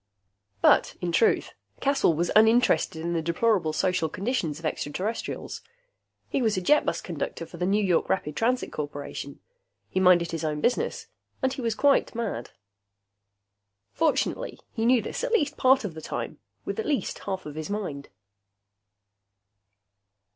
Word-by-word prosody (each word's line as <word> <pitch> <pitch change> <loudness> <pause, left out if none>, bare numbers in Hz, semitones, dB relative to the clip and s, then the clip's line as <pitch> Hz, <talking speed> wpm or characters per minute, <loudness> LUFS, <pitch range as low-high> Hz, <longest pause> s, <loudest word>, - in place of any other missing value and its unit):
But - - +5
in 175 -1 -2
truth, 220 +7 +2 0.3
Caswell 275 - +2
was 170 +2 0
uninterested 220 -8 +4
in 170 +1 -1
the 165 - 0
deplorable 170 +1 +1
social 165 0 0
conditions 185 - -2
of 165 - -9
extraterrestrials. 180 +9 -3 0.7
He 275 - -1
was 220 -5 +1
a - - 0
jetbus 300 +12 +2
conductor 165 - -4
for 170 - -12
the 180 +1 -1
New 205 +2 +2
York 180 -4 +2
Rapid 150 -5 -1
Transit 250 +2 0
Corporation. 145 -1 -6 0.5
He - - 0
minded 180 -2 +5
his 165 -1 -4
own 150 -1 -1
business. 250 - 0 0.4
And 265 0 +2
he 265 - -5
was 230 -2 -1
quite 280 -2 +3
mad. 225 - -3 1.4
Fortunately, - - 0
he 225 +1 0
knew 245 -3 +4
this - - -4
at - - -1
least 295 -10 +2
part 260 -2 +4
of 185 - -4
the 160 - -8
time, - - -5 0.3
with - - -3
at 440 - -2
least 285 - -1
half 190 -1 -4
of 150 - -6
his 155 +3 -5
mind. 180 -9 -4
185 Hz, 155 wpm, -26 LUFS, 160-235 Hz, 1.4 s, But